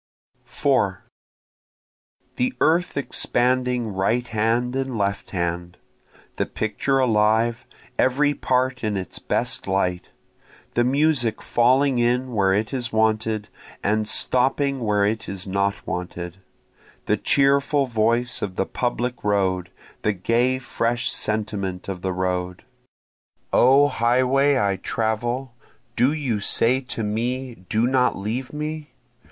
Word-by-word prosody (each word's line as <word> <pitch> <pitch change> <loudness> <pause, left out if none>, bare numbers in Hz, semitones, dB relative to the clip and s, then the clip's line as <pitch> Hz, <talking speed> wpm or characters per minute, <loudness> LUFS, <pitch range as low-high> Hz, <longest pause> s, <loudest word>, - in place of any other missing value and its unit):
4 - - 0 1.3
The 250 +1 0
earth 165 +2 +2
expanding 125 -3 0
right 115 +6 0
hand 115 +3 0
and 135 -3 -2
left 100 -1 -1
hand, 85 -1 -3 0.6
The - - 0
picture 135 +5 -1
alive, 115 -1 +2 0.3
every 145 +3 +3
part 130 -1 0
in 105 -2 0
its 95 -3 -5
best - - -2
light, 90 -2 -1 0.6
The 120 - +2
music 130 -3 +1
falling 130 +2 +2
in 125 +1 +1
where 100 -3 +2
it 105 +5 0
is 120 -2 -2
wanted, 110 -1 0 0.3
and 110 +1 +1
stopping 135 +4 +1
where 105 -3 +1
it 110 +2 -2
is 95 -1 -5
not 100 +1 -1
wanted, 90 0 -5 0.7
The - - +2
cheerful 140 +1 +2
voice 120 +1 0
of 95 -2 -3
the 95 - 0
public 125 +2 -2
road, 95 -3 0 0.3
the 105 - +1
gay 120 +7 +1
fresh 120 -2 -1
sentiment 105 -4 -3
of 95 -2 -5
the 95 - -1
road. 90 0 -2 0.9
O 135 +3 +6
highway 130 +3 +2
I 100 -5 +1
travel, 120 +5 -2 0.4
do 125 +4 +3
you 135 -9 -1
say 120 +5 +2
to 115 - -3
me 120 +4 -2 0.2
Do 110 +2 +2
not 125 0 +2
leave 115 +7 -3
me? 150 0 -5
115 Hz, 125 wpm, -23 LUFS, 100-130 Hz, 1.3 s, O